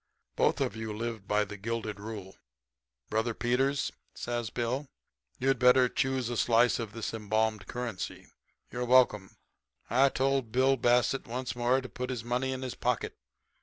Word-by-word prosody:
Both -, -, +2 dB
of -, -, 0 dB
you 110 Hz, -1 st, -5 dB
live 115 Hz, -3 st, -4 dB
by 105 Hz, 0 st, +2 dB
the 105 Hz, 0 st, -8 dB
gilded 110 Hz, 0 st, -3 dB
rule. 100 Hz, -3 st, -7 dB, 0.8 s
Brother 110 Hz, +1 st, 0 dB
Peters,' 135 Hz, +4 st, +1 dB, 0.2 s
says 120 Hz, -1 st, -3 dB
Bill, 125 Hz, +5 st, -2 dB, 0.5 s
'you'd 135 Hz, -1 st, +1 dB
better 125 Hz, 0 st, +6 dB
choose 130 Hz, -1 st, 0 dB
a 120 Hz, -, -2 dB
slice 120 Hz, +2 st, +4 dB
of 110 Hz, -3 st, -5 dB
this 115 Hz, 0 st, -4 dB
embalmed 110 Hz, -1 st, 0 dB
currency. 120 Hz, -6 st, -5 dB, 0.5 s
You're 125 Hz, 0 st, -2 dB
welcome.' 120 Hz, -6 st, +3 dB, 0.5 s
"I 135 Hz, +3 st, +5 dB
told 135 Hz, -3 st, 0 dB
Bill 130 Hz, +3 st, +4 dB
Bassett 120 Hz, +1 st, +2 dB
once 125 Hz, +2 st, -4 dB
more 125 Hz, +2 st, +2 dB
to 130 Hz, -, -7 dB
put 125 Hz, 0 st, -5 dB
his 125 Hz, -3 st, -3 dB
money 125 Hz, +2 st, -1 dB
in 130 Hz, 0 st, -4 dB
his 130 Hz, -, -3 dB
pocket. 125 Hz, -2 st, -1 dB
120 Hz, 160 wpm, -30 LUFS, 110-130 Hz, 0.8 s, better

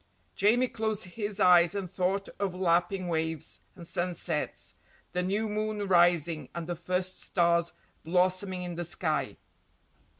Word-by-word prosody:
Jamie 230 Hz, +5 st, +3 dB
closed 220 Hz, -3 st, -2 dB
his 205 Hz, +2 st, -5 dB
eyes 175 Hz, -2 st, +6 dB
and 195 Hz, -2 st, -2 dB
thought 195 Hz, +2 st, -1 dB
of 195 Hz, -3 st, -1 dB
lapping 180 Hz, +1 st, +1 dB
waves, 160 Hz, -2 st, -2 dB, 0.2 s
and 170 Hz, -2 st, -10 dB
sunsets, 175 Hz, -3 st, -3 dB, 0.4 s
the 180 Hz, -, 0 dB
new 200 Hz, +4 st, 0 dB
moon 210 Hz, -1 st, -2 dB
rising 170 Hz, -3 st, +3 dB
and 170 Hz, -1 st, -4 dB
the 175 Hz, -, -3 dB
first 180 Hz, +2 st, -1 dB
stars 170 Hz, -1 st, +2 dB, 0.3 s
blossoming 185 Hz, +2 st, +1 dB
in 175 Hz, -1 st, -5 dB
the 175 Hz, +1 st, -4 dB
sky. 155 Hz, -5 st, -1 dB
180 Hz, 135 wpm, -29 LUFS, 170-195 Hz, 0.4 s, eyes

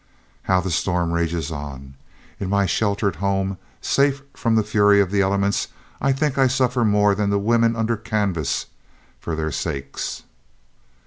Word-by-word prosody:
"How 95 Hz, -1 st, +4 dB
the 95 Hz, 0 st, -3 dB
storm 85 Hz, +1 st, 0 dB
rages 85 Hz, -2 st, -1 dB
on! 70 Hz, -3 st, -7 dB, 0.5 s
In 95 Hz, -, -3 dB
my 100 Hz, 0 st, +2 dB
sheltered 100 Hz, -2 st, 0 dB
home, 95 Hz, 0 st, -1 dB, 0.2 s
safe 140 Hz, 0 st, +1 dB
from 115 Hz, -2 st, 0 dB
the 110 Hz, -, +3 dB
fury 105 Hz, -1 st, +4 dB
of 95 Hz, -2 st, +2 dB
the 100 Hz, -1 st, +2 dB
elements, 100 Hz, +1 st, +1 dB, 0.3 s
I 135 Hz, -, +2 dB
think 140 Hz, 0 st, 0 dB
I 135 Hz, -, +5 dB
suffer 125 Hz, -1 st, +1 dB
more 105 Hz, -1 st, +4 dB
than 100 Hz, 0 st, 0 dB
the 100 Hz, -, +2 dB
women 115 Hz, +2 st, +2 dB
under 115 Hz, 0 st, 0 dB
canvas, 100 Hz, -10 st, -1 dB, 0.5 s
for 85 Hz, -, -4 dB
their 80 Hz, 0 st, -2 dB
sakes.... 70 Hz, 0 st, -4 dB
100 Hz, 155 wpm, -22 LUFS, 85-110 Hz, 0.5 s, I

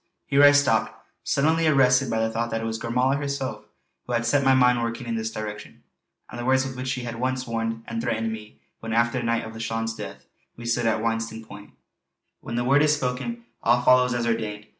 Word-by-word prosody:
Here 140 Hz, -, +3 dB
I 145 Hz, 0 st, +9 dB
stopped, 145 Hz, -1 st, +2 dB, 0.3 s
suddenly 160 Hz, +3 st, +2 dB
arrested 135 Hz, -3 st, +4 dB
by 110 Hz, -1 st, 0 dB
the 110 Hz, 0 st, 0 dB
thought 115 Hz, +1 st, -2 dB
that 115 Hz, 0 st, -2 dB
it -, -, -5 dB
was 110 Hz, 0 st, -3 dB
Gormala 125 Hz, +4 st, +1 dB
herself 135 Hz, -6 st, -4 dB, 0.4 s
who 125 Hz, -, -3 dB
had 120 Hz, 0 st, 0 dB
set 140 Hz, +4 st, +2 dB
my 135 Hz, 0 st, +5 dB
mind 125 Hz, -2 st, +4 dB
working 115 Hz, +1 st, -3 dB
in 115 Hz, -, -3 dB
this 110 Hz, 0 st, -2 dB
direction; 105 Hz, -1 st, -7 dB, 0.4 s
and 120 Hz, -, -9 dB
the -, -, -4 dB
words 130 Hz, +1 st, +3 dB
with 130 Hz, -1 st, -6 dB
which 130 Hz, 0 st, -5 dB
she 130 Hz, -1 st, -2 dB
had 120 Hz, -1 st, -5 dB
at 115 Hz, -, -9 dB
once 130 Hz, +1 st, -1 dB
warned 115 Hz, -1 st, -3 dB
and 230 Hz, -, -4 dB
threatened 115 Hz, -, -1 dB
me 105 Hz, -1 st, -11 dB, 0.2 s
when 115 Hz, 0 st, -5 dB
after 115 Hz, +2 st, +2 dB
the -, -, -4 dB
night 115 Hz, 0 st, 0 dB
of 110 Hz, -, -8 dB
Lauchlane's 115 Hz, 0 st, -3 dB
death 100 Hz, -3 st, -9 dB, 0.3 s
we 120 Hz, -, -9 dB
stood 115 Hz, 0 st, 0 dB
at 110 Hz, -1 st, +1 dB
Witsennan 115 Hz, 0 st, -2 dB
point: 100 Hz, 0 st, -12 dB, 0.7 s
"_When 115 Hz, -, -5 dB
the 120 Hz, -, 0 dB
Word 140 Hz, +3 st, +4 dB
is 150 Hz, 0 st, +4 dB
spoken 145 Hz, -, -3 dB, 0.2 s
all 120 Hz, +1 st, +3 dB
follows 125 Hz, -1 st, +4 dB
as 120 Hz, -1 st, -1 dB
ordained. 110 Hz, -3 st, -2 dB
120 Hz, 225 wpm, -25 LUFS, 115-130 Hz, 0.7 s, I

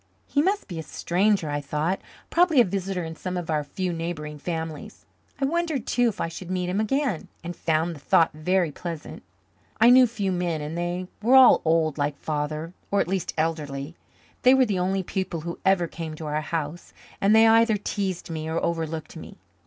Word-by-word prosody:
He 285 Hz, -, +1 dB
must 395 Hz, +5 st, 0 dB
be 170 Hz, -4 st, -6 dB
a -, -, -2 dB
stranger, 185 Hz, +3 st, 0 dB
I 145 Hz, 0 st, -1 dB
thought 150 Hz, +6 st, -1 dB, 0.3 s
probably 340 Hz, -5 st, +4 dB
a -, -, +8 dB
visitor 190 Hz, -1 st, -2 dB
in 160 Hz, 0 st, -6 dB
some 185 Hz, +2 st, -4 dB
of 170 Hz, -2 st, -3 dB
our 150 Hz, -1 st, +1 dB
few 180 Hz, +5 st, -3 dB
neighbouring 160 Hz, -3 st, -5 dB
families. 160 Hz, -2 st, -5 dB, 0.3 s
I 275 Hz, -, +1 dB
wondered 320 Hz, -4 st, -1 dB
too 245 Hz, -1 st, +2 dB
if 210 Hz, -, -7 dB
I -, -, 0 dB
should 170 Hz, +2 st, -8 dB
meet 180 Hz, -1 st, -1 dB
him 190 Hz, +3 st, 0 dB
again, 245 Hz, -, 0 dB, 0.2 s
and 175 Hz, +1 st, -5 dB
found 165 Hz, +1 st, 0 dB
the -, -, -11 dB
thought 160 Hz, +3 st, +3 dB
very 175 Hz, +2 st, +1 dB
pleasant. 165 Hz, 0 st, -7 dB, 0.6 s
I 235 Hz, +2 st, +7 dB
knew 255 Hz, 0 st, +7 dB
few 205 Hz, -5 st, -2 dB
men 175 Hz, -3 st, -1 dB
and 150 Hz, +2 st, -5 dB
they 175 Hz, +1 st, -2 dB, 0.2 s
were 240 Hz, +5 st, +4 dB
all 260 Hz, -1 st, +8 dB
old, 160 Hz, -2 st, +1 dB
like 145 Hz, 0 st, -1 dB
Father, 155 Hz, +3 st, -3 dB, 0.2 s
or 200 Hz, -, +1 dB
at -, -, +1 dB
least 190 Hz, 0 st, -2 dB
elderly. 155 Hz, -2 st, -2 dB, 0.5 s
They 255 Hz, +1 st, +6 dB
were 265 Hz, -1 st, +5 dB
the 200 Hz, -5 st, -1 dB
only 190 Hz, +1 st, 0 dB
people 185 Hz, -3 st, -3 dB
who 170 Hz, +2 st, -6 dB
ever 190 Hz, -2 st, +3 dB
came 165 Hz, -1 st, -6 dB
to 155 Hz, -, -8 dB
our 150 Hz, 0 st, -1 dB
house, 160 Hz, +1 st, -4 dB, 0.3 s
and 200 Hz, +2 st, +5 dB
they 225 Hz, 0 st, +7 dB
either 225 Hz, -1 st, +5 dB
teased 195 Hz, -4 st, -3 dB
me 160 Hz, 0 st, -4 dB
or 160 Hz, -, -1 dB
overlooked 160 Hz, -2 st, -3 dB
me. -, -, -10 dB
175 Hz, 200 wpm, -25 LUFS, 160-200 Hz, 0.6 s, a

